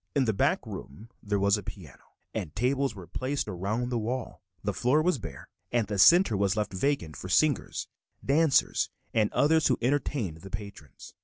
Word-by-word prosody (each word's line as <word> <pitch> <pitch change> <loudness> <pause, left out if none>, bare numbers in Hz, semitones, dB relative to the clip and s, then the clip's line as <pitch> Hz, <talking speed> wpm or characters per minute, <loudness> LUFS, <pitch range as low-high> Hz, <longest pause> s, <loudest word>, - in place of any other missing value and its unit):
In 140 -2 +3
the 110 - +1
back 100 - +1
room 90 +13 -9
there 105 -1 -1
was 100 +1 +3
a - - -5
piano, 85 - -10 0.3
and 95 -8 -5
tables 130 +2 0
were 95 -3 -9
placed 135 +9 -3
around 105 +7 -2
the 120 -2 -1
wall. 120 +3 -4 0.2
The 105 0 -1
floor 125 +9 +2
was 175 -5 +1
bare 80 - -9 0.2
and 120 -2 +2
the 105 -2 -3
center 170 - +7
was 100 +1 +1
left 105 -2 -1
vacant 95 - -1
for - - -7
singers, - - +1 0.4
dancers, 150 +1 +3 0.2
and 110 -2 +2
others 160 +1 +3
who - - +2
entertained 125 - -1
the 95 +4 -11
patrons. 100 -7 -9
110 Hz, 180 wpm, -28 LUFS, 100-135 Hz, 0.4 s, center